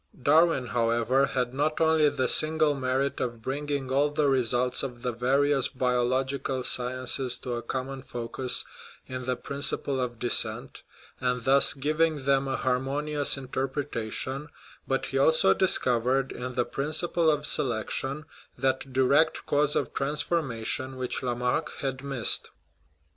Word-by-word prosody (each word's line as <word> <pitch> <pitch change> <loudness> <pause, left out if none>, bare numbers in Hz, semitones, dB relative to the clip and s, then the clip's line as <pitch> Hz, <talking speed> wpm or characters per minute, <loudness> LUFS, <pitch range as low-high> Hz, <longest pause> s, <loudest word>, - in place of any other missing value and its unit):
Darwin, 155 0 +3
however, 120 +3 +1
had 125 -2 -2
not 150 +3 -1
only 160 -2 +4
the 130 -2 -1
signal 155 -1 +3
merit 135 0 -1
of 120 -2 -3
bringing 140 +2 -3
all 140 +2 +2
the 145 0 0
results 125 -1 +1
of 125 -3 -6
the 125 - 0
various 135 +3 +2
biological 130 +1 -1
sciences 130 +1 -1
to 125 - -5
a 120 - -3
common 130 +3 -5
focus 125 0 -1 0.4
in 130 -1 -6
the 125 0 0
principle 140 0 -1
of 120 -2 -3
descent, 120 +1 0 0.4
and 125 -1 -1
thus 135 +3 +5
giving 155 +1 0
them 135 0 +2
a 135 - -1
harmonious 140 +3 +1
interpretation, 135 0 -3 0.4
but 135 0 -1
he 135 - -2
also 140 -9 +4
discovered, 130 - +2
in 125 0 -6
the 120 - +1
principle 160 +3 0
of 150 -1 0
selection, 135 +4 -1 0.3
that 130 0 -1
direct 140 +5 +2
cause 150 0 +1
of - - -1
transformation 135 -4 -1
which 130 -1 -3
Lamarck 125 0 -1
had 135 -1 -3
missed. 135 -5 -1
135 Hz, 135 wpm, -27 LUFS, 125-145 Hz, 0.4 s, thus